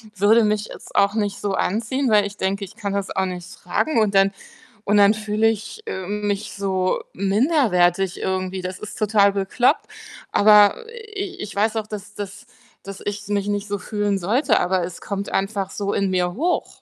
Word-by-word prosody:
würde 210 +4 +5
mich 210 0 +1
jetzt - - -12
auch 200 +1 +3
nicht 205 -2 -1
so 200 -1 -1
anziehen, 235 +7 0
weil 205 -1 +4
ich 205 - -11
denke, 195 +1 -1
ich 195 - -9
kann 205 -3 -4
das 200 -1 -2
auch 190 - +1
nicht 180 -1 -6
tragen 230 - 0
und 210 -2 +2
dann 195 0 +4 0.5
und 210 +1 +3
dann 205 +1 +6
fühle 215 +1 0
ich, 225 - -3
ähm, 205 +3 -4
mich 205 +1 -3
so 190 -2 -1
minderwertig 195 - +2
irgendwie. 185 0 -2
Das 185 0 -5
ist 215 - -8
total 205 -2 +3
bekloppt, 200 +5 +1 0.5
aber, 210 - +6
äh, 435 -4 -6
i 375 - -9
ich 205 -1 -7
weiß 215 +2 +1
auch, 220 -1 -1
dass 210 -1 -8
dass 205 +3 -7 0.3
dass 195 0 -9
ich 205 0 -4
mich 205 -1 -1
nicht 205 0 -2
so 205 0 -2
fühlen 205 +1 -1
sollte, 215 - +2
aber 185 +1 +1
es 175 0 -6
kommt 200 0 -4
einfach 195 0 -1
so 200 0 -3
in 200 -1 +1
mir 180 -1 0
hoch. 340 - -2
205 Hz, 195 wpm, -22 LUFS, 195-215 Hz, 0.5 s, dann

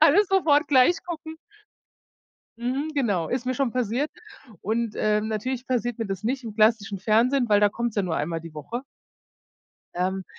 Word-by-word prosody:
alles 340 +6 +5
sofort 320 -6 +3
gleich 285 +7 +5
gucken. 320 -2 -6 1.2
Mhm, 265 +6 -2
genau, 205 - 0
ist 250 0 -2
mir 255 - 0
schon 260 -3 0
passiert. 250 +4 -1 0.5
Und, 225 +1 -1
äh, 210 0 +1
natürlich 235 +4 -3
passiert 240 -2 -1
mir 225 - -2
das 195 -2 -4
nicht 255 +3 -2
im 220 -2 -6
klassischen 215 -2 +2
Fernsehen, 240 +5 +2
weil 205 -1 +4
da 205 - +5
kommt's 235 -1 -3
ja 205 - +2
nur 170 -4 -2
einmal 165 +2 -2
die 165 -1 -10
Woche. 190 - -6 1.1
Ähm, 185 +1 -1
235 Hz, 170 wpm, -25 LUFS, 205-265 Hz, 1.2 s, alles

